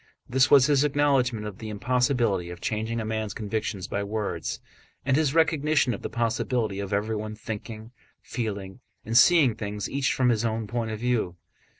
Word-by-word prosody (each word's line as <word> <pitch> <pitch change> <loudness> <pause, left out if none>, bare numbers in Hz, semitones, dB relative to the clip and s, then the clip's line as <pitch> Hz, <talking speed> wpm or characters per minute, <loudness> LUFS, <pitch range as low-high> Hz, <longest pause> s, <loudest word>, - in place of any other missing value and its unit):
This 130 +1 +3
was 140 -3 +7
his 145 -1 +3
acknowledgment 135 -6 +1
of 105 -3 -7
the 110 - -6
impossibility 115 -3 +1
of 90 0 -8
changing 110 +3 -2
a 110 - -3
man's 110 -1 -3
convictions 105 -3 -3
by 100 - -2
words, 105 0 -3 0.5
and 135 -1 +3
his 150 -1 +1
recognition 155 -5 +3
of 100 - -6
the - - -4
possibility 115 -3 -1
of 100 0 -4
everyone 110 +1 -2
thinking, 110 +1 -7 0.3
feeling, 100 -3 -5 0.3
and 115 +2 -3
seeing 140 0 +6
things 105 -1 -4
each 140 0 0
from 125 -1 +2
his 115 -2 +1
own 115 -1 -1
point 115 +1 -3
of 110 - -3
view. 115 -7 0
115 Hz, 175 wpm, -26 LUFS, 105-130 Hz, 0.5 s, was